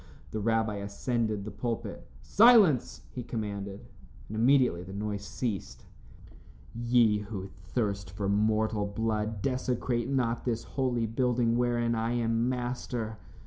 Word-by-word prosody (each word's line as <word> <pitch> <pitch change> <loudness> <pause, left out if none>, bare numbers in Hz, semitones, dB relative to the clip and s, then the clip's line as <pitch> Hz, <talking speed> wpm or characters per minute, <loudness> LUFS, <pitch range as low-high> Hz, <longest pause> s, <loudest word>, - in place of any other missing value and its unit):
The 110 - -2
rabbi 110 -1 +1
ascended 105 +1 -2
the 110 - -5
pulpit. 120 -2 -4 0.2
"Silence!" 210 - +5
he 125 - -5
commanded, 100 -4 -5 0.4
and 110 - -6
immediately 120 -5 +4
the 95 +2 -9
noise 105 0 -3
ceased. 105 -2 -4 0.9
"Ye 115 -2 +3
who 100 -2 -6
thirst 100 +1 -3
for 100 +1 -3
mortal 105 +1 +1
blood, 110 0 -2
desecrate 125 -2 -1
not 120 -4 0
this 115 -2 -1
holy 125 -4 -1
building 120 0 +1
wherein 120 -1 +1
I 115 +1 0
am 115 0 +1
master. 120 -3 -3
115 Hz, 125 wpm, -29 LUFS, 105-120 Hz, 0.9 s, Silence